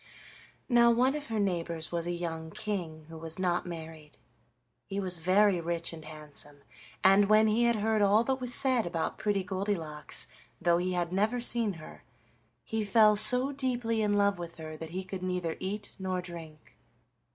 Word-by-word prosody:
Now 235 Hz, -2 st, +5 dB
one 250 Hz, +3 st, +3 dB
of 300 Hz, 0 st, -5 dB
her 225 Hz, -1 st, -2 dB
neighbors 170 Hz, -4 st, -2 dB
was 170 Hz, 0 st, -2 dB
a -, -, -1 dB
young 165 Hz, -2 st, -4 dB
king 165 Hz, -5 st, -5 dB
who 165 Hz, 0 st, -10 dB
was 160 Hz, 0 st, -4 dB
not 180 Hz, -1 st, 0 dB
married. 160 Hz, -3 st, -9 dB, 0.7 s
He 195 Hz, -, -3 dB
was 185 Hz, -3 st, -2 dB
very 185 Hz, +2 st, +3 dB
rich 170 Hz, 0 st, -3 dB
and 160 Hz, -1 st, -9 dB
handsome, 150 Hz, -2 st, -8 dB, 0.4 s
and 195 Hz, +1 st, +5 dB
when 215 Hz, 0 st, +6 dB
he 225 Hz, +3 st, +2 dB
heard 220 Hz, -1 st, +1 dB
all 205 Hz, +3 st, +4 dB
that 265 Hz, +2 st, -1 dB
was 250 Hz, -1 st, -2 dB
said 255 Hz, -7 st, +3 dB
about 170 Hz, +2 st, -3 dB
Pretty 205 Hz, -3 st, 0 dB
Goldilocks, 180 Hz, -5 st, -2 dB, 0.3 s
though 170 Hz, 0 st, +3 dB
he 180 Hz, +1 st, -1 dB
had 175 Hz, 0 st, -1 dB
never 215 Hz, +6 st, +1 dB
seen 235 Hz, -3 st, +1 dB
her, 165 Hz, -3 st, -12 dB, 0.6 s
he 220 Hz, -1 st, -2 dB
fell 210 Hz, +1 st, +5 dB
so 250 Hz, +6 st, +5 dB
deeply 245 Hz, -5 st, -1 dB
in 205 Hz, -1 st, +1 dB
love 200 Hz, -2 st, +2 dB
with 170 Hz, -1 st, -7 dB
her 155 Hz, -1 st, -8 dB
that 160 Hz, +1 st, -7 dB
he 185 Hz, +3 st, -4 dB
could 185 Hz, 0 st, -7 dB
neither 180 Hz, -3 st, -2 dB
eat 205 Hz, +3 st, -5 dB
nor 185 Hz, -1 st, -2 dB
drink. 165 Hz, -4 st, -10 dB
185 Hz, 175 wpm, -30 LUFS, 165-215 Hz, 0.7 s, when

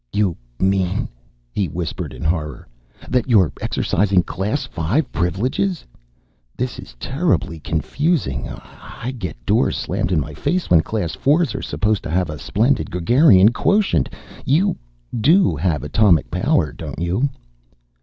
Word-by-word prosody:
"You 100 Hz, -2 st, +1 dB, 0.2 s
mean," 95 Hz, +3 st, +1 dB, 0.4 s
he 100 Hz, +5 st, -1 dB
whispered 85 Hz, +2 st, -4 dB
in -, -, -9 dB
horror, 80 Hz, -1 st, -2 dB, 0.4 s
"that 125 Hz, 0 st, 0 dB
you're 100 Hz, -9 st, +4 dB
exercising 95 Hz, -1 st, +1 dB
Class 105 Hz, +12 st, -2 dB
V 90 Hz, -, 0 dB
privileges? 125 Hz, -, -1 dB, 0.7 s
This 125 Hz, 0 st, -3 dB
is -, -, -11 dB
terribly 135 Hz, -, -1 dB
confusing. 80 Hz, -, -1 dB
I 125 Hz, +2 st, -8 dB
get 90 Hz, -, -5 dB
doors -, -, +2 dB
slammed 90 Hz, -, -2 dB
in 85 Hz, -, +3 dB
my 75 Hz, +1 st, -4 dB
face, 175 Hz, -, -2 dB
when 85 Hz, -3 st, +7 dB
Class 100 Hz, -3 st, -3 dB
Fours 150 Hz, -1 st, +2 dB
are -, -, -4 dB
supposed 105 Hz, -1 st, 0 dB
to -, -, -6 dB
have 90 Hz, 0 st, 0 dB
a 75 Hz, -, -7 dB
splendid 120 Hz, +5 st, +1 dB
gregarian 100 Hz, -, +5 dB
quotient 200 Hz, -, +2 dB, 0.3 s
you 175 Hz, +7 st, +2 dB, 0.4 s
do 160 Hz, -, +4 dB
have 80 Hz, -8 st, -1 dB
atomic 85 Hz, +1 st, +3 dB
power, 75 Hz, -4 st, +1 dB
don't -, -, -7 dB
you?" 90 Hz, +11 st, 0 dB
100 Hz, 135 wpm, -20 LUFS, 85-130 Hz, 0.7 s, when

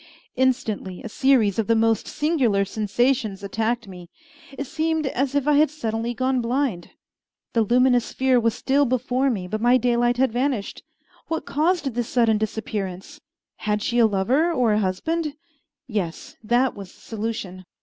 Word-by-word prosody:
Instantly 240 Hz, -8 st, -1 dB
a -, -, -6 dB
series 230 Hz, -5 st, +2 dB
of 220 Hz, -, 0 dB
the 230 Hz, -, +3 dB
most 225 Hz, -1 st, +2 dB
singular 270 Hz, -11 st, +1 dB
sensations 215 Hz, 0 st, 0 dB
attacked 225 Hz, +3 st, -2 dB
me. 180 Hz, -3 st, -11 dB, 0.5 s
It 280 Hz, -, -3 dB
seemed 320 Hz, +1 st, -1 dB
as 270 Hz, +1 st, -1 dB
if 285 Hz, 0 st, +1 dB
I 300 Hz, -, +4 dB
had 305 Hz, 0 st, +4 dB
suddenly 235 Hz, -4 st, -3 dB
gone 260 Hz, 0 st, 0 dB
blind. 240 Hz, -7 st, -1 dB, 0.6 s
The 230 Hz, -, +3 dB
luminous 245 Hz, +2 st, +3 dB
sphere 260 Hz, -1 st, +2 dB
was 230 Hz, -1 st, +1 dB
still 280 Hz, +1 st, +2 dB
before 255 Hz, +1 st, 0 dB
me, 195 Hz, -7 st, -3 dB
but 215 Hz, +3 st, -3 dB
my 245 Hz, +2 st, +5 dB
daylight 240 Hz, 0 st, +1 dB
had 265 Hz, -1 st, +2 dB
vanished. 245 Hz, -3 st, -2 dB, 0.5 s
What 325 Hz, -, -3 dB
caused 310 Hz, -2 st, 0 dB
this 240 Hz, 0 st, -2 dB
sudden 230 Hz, -3 st, +2 dB
disappearance? 205 Hz, -3 st, -4 dB, 0.4 s
Had 210 Hz, -1 st, -1 dB
she 240 Hz, -1 st, 0 dB
a 230 Hz, -, +6 dB
lover 245 Hz, -, +1 dB
or 245 Hz, -9 st, +2 dB
a 210 Hz, -, +2 dB
husband? 295 Hz, -, -2 dB, 0.5 s
Yes, 200 Hz, -9 st, -4 dB
that 240 Hz, +4 st, +2 dB
was 195 Hz, -3 st, -9 dB
the -, -, -21 dB
solution! 210 Hz, -4 st, -5 dB
240 Hz, 160 wpm, -23 LUFS, 210-265 Hz, 0.6 s, a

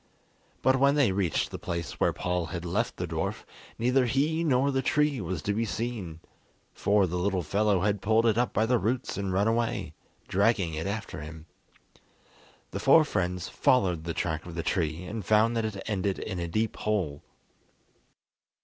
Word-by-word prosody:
But 130 Hz, 0 st, +4 dB
when 140 Hz, +1 st, +4 dB
they 140 Hz, -8 st, +3 dB
reached 95 Hz, -4 st, 0 dB
the -, -, -6 dB
place 85 Hz, -2 st, -4 dB
where -, -, +3 dB
Paul 90 Hz, -1 st, -2 dB
had 85 Hz, 0 st, -5 dB
left 100 Hz, +7 st, -1 dB
the 90 Hz, -, -2 dB
dwarf, 80 Hz, -1 st, -3 dB, 0.3 s
neither 125 Hz, +2 st, +2 dB
he 150 Hz, +6 st, +1 dB
nor 140 Hz, -2 st, +2 dB
the 135 Hz, -1 st, +1 dB
tree 150 Hz, -3 st, +1 dB
was 85 Hz, -3 st, -4 dB
to 105 Hz, -, 0 dB
be 110 Hz, +3 st, 0 dB
seen, 105 Hz, -7 st, -4 dB, 0.5 s
for 100 Hz, -1 st, +2 dB
the 90 Hz, 0 st, -2 dB
little 95 Hz, -1 st, 0 dB
fellow 100 Hz, +3 st, +1 dB
had 100 Hz, 0 st, 0 dB
pulled 110 Hz, +2 st, +3 dB
it 110 Hz, -3 st, +4 dB
up 120 Hz, +2 st, +1 dB
by 110 Hz, -, +2 dB
the 120 Hz, +1 st, +2 dB
roots 120 Hz, +5 st, -1 dB
and 100 Hz, -1 st, -2 dB
run 100 Hz, +3 st, +2 dB
away, 115 Hz, -7 st, -1 dB, 0.3 s
dragging 100 Hz, -4 st, +2 dB
it 80 Hz, +4 st, -3 dB
after 110 Hz, -4 st, -4 dB
him. 80 Hz, +1 st, -9 dB, 1.3 s
The -, -, -4 dB
four 155 Hz, +3 st, +6 dB
friends 90 Hz, -, -2 dB
followed 90 Hz, -10 st, +2 dB
the 85 Hz, -, -3 dB
track 80 Hz, -1 st, -2 dB
of 85 Hz, -, -8 dB
the 85 Hz, -, -2 dB
tree 80 Hz, -2 st, -1 dB
and 105 Hz, +3 st, -5 dB
found 110 Hz, +4 st, +3 dB
that 115 Hz, -1 st, 0 dB
it 100 Hz, -3 st, -4 dB
ended 100 Hz, -2 st, -1 dB
in 95 Hz, -4 st, -4 dB
a 85 Hz, -, -2 dB
deep 110 Hz, +6 st, -1 dB
hole. 90 Hz, -10 st, -1 dB
100 Hz, 185 wpm, -28 LUFS, 90-115 Hz, 1.3 s, four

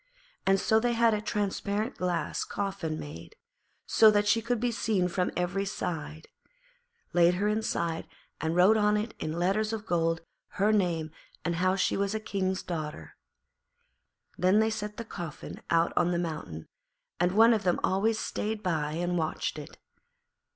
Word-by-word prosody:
And 195 Hz, 0 st, +4 dB
so 220 Hz, +3 st, +3 dB
they 240 Hz, +1 st, +1 dB
had 230 Hz, -1 st, +4 dB
a 210 Hz, -, -1 dB
transparent 210 Hz, +2 st, -2 dB
glass 180 Hz, -1 st, -1 dB
coffin 190 Hz, -6 st, -3 dB
made, 150 Hz, -, -9 dB, 0.5 s
so 220 Hz, -, +6 dB
that 205 Hz, -1 st, +2 dB
she 225 Hz, +2 st, +3 dB
could 235 Hz, +1 st, -1 dB
be 245 Hz, +1 st, 0 dB
seen 210 Hz, -5 st, +1 dB
from 180 Hz, +1 st, 0 dB
every 180 Hz, +2 st, 0 dB
side, 160 Hz, -5 st, -5 dB, 0.9 s
laid 175 Hz, 0 st, +5 dB
her 200 Hz, +3 st, 0 dB
inside 210 Hz, -6 st, -1 dB, 0.3 s
and 160 Hz, +1 st, -1 dB
wrote 190 Hz, +5 st, +6 dB
on 210 Hz, 0 st, +3 dB
it 215 Hz, +2 st, -3 dB
in 155 Hz, -, -3 dB
letters 200 Hz, +5 st, +1 dB
of 220 Hz, -1 st, -4 dB
gold 165 Hz, -3 st, +1 dB, 0.4 s
her 205 Hz, +2 st, +3 dB
name 170 Hz, -6 st, 0 dB, 0.3 s
and 170 Hz, 0 st, 0 dB
how 185 Hz, +2 st, +2 dB
she 195 Hz, -, +1 dB
was 200 Hz, +1 st, 0 dB
a -, -, 0 dB
King's 190 Hz, -3 st, -2 dB
daughter. 150 Hz, -, -5 dB, 1.2 s
Then 185 Hz, +3 st, +4 dB
they 220 Hz, 0 st, +2 dB
set 210 Hz, -1 st, -5 dB
the 230 Hz, -, -5 dB
coffin 170 Hz, -7 st, -7 dB
out 165 Hz, 0 st, +2 dB
on 175 Hz, -, +3 dB
the 175 Hz, -, 0 dB
mountain, 155 Hz, -, -5 dB, 0.5 s
and 180 Hz, +1 st, +2 dB
one 225 Hz, +3 st, +7 dB
of 220 Hz, -, +1 dB
them 180 Hz, -1 st, +1 dB
always 215 Hz, +4 st, +2 dB
stayed 215 Hz, 0 st, -3 dB
by 155 Hz, -5 st, -1 dB
and 175 Hz, +1 st, -1 dB
watched 155 Hz, -1 st, -2 dB
it. 145 Hz, -, -11 dB
190 Hz, 165 wpm, -29 LUFS, 170-215 Hz, 1.2 s, one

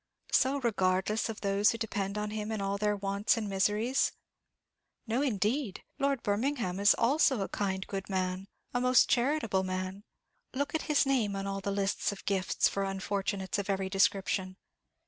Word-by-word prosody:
so 270 Hz, +2 st, +3 dB
regardless 200 Hz, -1 st, +1 dB
of 220 Hz, -, -6 dB
those 200 Hz, +1 st, +3 dB
who 230 Hz, -, -1 dB
depend 205 Hz, -3 st, -3 dB
on 210 Hz, 0 st, -2 dB
him 215 Hz, 0 st, -4 dB
in 220 Hz, -, -2 dB
all 195 Hz, 0 st, -1 dB
their 210 Hz, +1 st, +1 dB
wants 200 Hz, +3 st, +1 dB
and 220 Hz, -2 st, -2 dB
miseries? 210 Hz, +6 st, +1 dB, 0.9 s
No, 235 Hz, +3 st, 0 dB
indeed; 230 Hz, -2 st, -1 dB, 0.2 s
Lord 275 Hz, -3 st, 0 dB
Birmingham 205 Hz, -3 st, -1 dB
is 205 Hz, +1 st, +6 dB
also 265 Hz, -1 st, +3 dB
a 195 Hz, -, -1 dB
kind, 190 Hz, -2 st, -2 dB
good 195 Hz, 0 st, -5 dB
man, 185 Hz, 0 st, -2 dB, 0.3 s
a 245 Hz, -, 0 dB
most 250 Hz, 0 st, +5 dB
charitable 240 Hz, -6 st, +1 dB
man! 185 Hz, +1 st, -4 dB, 0.5 s
Look 285 Hz, +2 st, -1 dB
at 320 Hz, -, 0 dB
his 295 Hz, -1 st, +4 dB
name 240 Hz, -7 st, +1 dB
on 195 Hz, 0 st, -3 dB
all 195 Hz, 0 st, -3 dB
the 200 Hz, -, -3 dB
lists 200 Hz, 0 st, 0 dB
of 200 Hz, -1 st, -10 dB
gifts 190 Hz, -2 st, +1 dB
for 200 Hz, -, -2 dB
unfortunates 195 Hz, 0 st, -2 dB
of 200 Hz, -, -4 dB
every 195 Hz, -1 st, 0 dB
description. 190 Hz, -1 st, +1 dB
200 Hz, 170 wpm, -30 LUFS, 195-230 Hz, 0.9 s, is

